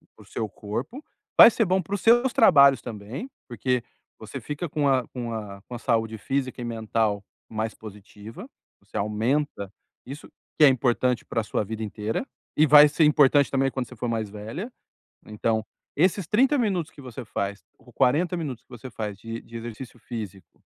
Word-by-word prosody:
para - - -16
o - - -21
seu 110 -2 -4
corpo, 115 - -6 0.4
vai - - +12
ser 225 - +1
bom 185 0 +2
para 195 +4 -4
os 200 - -5
seus 240 +3 +4
trabalhos 140 - +6
também, 120 - -7 0.2
porque 125 +1 -1 0.4
você - - -8
fica 150 +4 -4
com 150 -1 0
a 130 -2 +2
com 120 -2 -5
a 100 -3 -7
com 120 - -9
a - - -6
saúde 110 -3 0
física 130 +2 -3
e - - -4
mental 110 -3 -1 0.3
mais 110 0 -3
positiva, 105 +1 -11 0.3
você - - -9
aumenta 110 +1 -1 0.3
isso, 140 +3 -9 0.3
que - - +5
é - - +9
importante 125 -1 +1
para 115 - -1
a - - -7
sua 105 - -1
vida 110 +2 -5
inteira, 105 - -3 0.3
e 155 - +6
vai 150 0 +9
ser 150 +2 +1
importante, 145 -2 +5
também, 135 0 +2
quando 130 -1 -3
você 125 - -12
for 120 +2 -4
mais 110 -2 -2
velha. 110 - -7 0.5
Então, 110 +1 -1 0.3
esses 180 +3 +2
30 265 - +3
minutos 195 - -1
que 145 - -14
você 130 -1 -8
faz, 100 -2 -4
ou - - -20
40 165 +8 +2
minutos 145 -9 -5
que - - -52
você 125 0 -9
faz 105 -4 -5
de 115 +2 -7
de 115 - -15
exercício 120 +2 -8
físico, 105 -6 -8
125 Hz, 190 wpm, -25 LUFS, 110-150 Hz, 0.5 s, vai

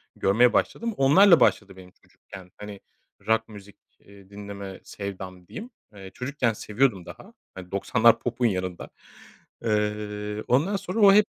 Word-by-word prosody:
görmeye 120 +5 +3
başladım. 230 0 -1
Onlarla 170 +7 +6
başladı 95 -2 +1
benim 90 -1 -14
çocukken 95 -1 -15
hani 105 -1 -9 0.5
rock 110 0 +1
müzik, 100 -1 -13 0.2
iii, 100 -1 -18
dinleme 100 -1 -9
sevdam 95 -3 -8
diyeyim. 230 +3 -9 0.2
Eee, 95 -2 -11
çocukken 125 -2 -2
seviyordum 105 -3 -1
daha. - - -13 0.2
Hani 90 -1 -10
90'lar 110 +4 +3
popun 120 0 -2
yanında. 95 -4 -2 0.7
Iıı, 105 -1 -2
ondan 155 +11 +2
sonra 190 +2 -4
o 200 -2 +7
hep 210 +1 +5
105 Hz, 135 wpm, -25 LUFS, 100-125 Hz, 0.7 s, o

